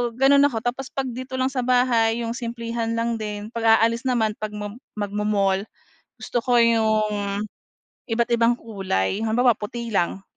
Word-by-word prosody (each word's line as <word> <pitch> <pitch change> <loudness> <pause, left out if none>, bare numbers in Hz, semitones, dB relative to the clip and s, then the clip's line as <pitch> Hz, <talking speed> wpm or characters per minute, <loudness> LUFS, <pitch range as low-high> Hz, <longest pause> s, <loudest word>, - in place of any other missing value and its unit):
gano'n 280 +2 +5
ako 230 -5 -4
tapos 255 +2 -3
'pag 265 -2 -2
dito 255 +2 -6
lang 260 +1 0
sa 260 - -2
bahay 240 -2 +2
'yong 230 - -3
simplihan 230 -1 -3
lang 230 0 -1
din. 210 0 -5
'Pag 230 -1 -1
aalis 230 +3 +1
naman, 225 -4 +2
'pag 215 0 -5
mom 210 +2 -6 0.2
mag-mo-mall 205 -1 0 0.5
gusto 240 - -2
ko 245 -1 +3
'yong 215 -3 +1 0.6
iba't 235 0 0
ibang 235 0 +3
kulay. 195 - -2
Halimbawa, 235 +1 +3
puti 235 +3 -5
lang 190 -1 0
230 Hz, 155 wpm, -23 LUFS, 210-245 Hz, 0.6 s, gano'n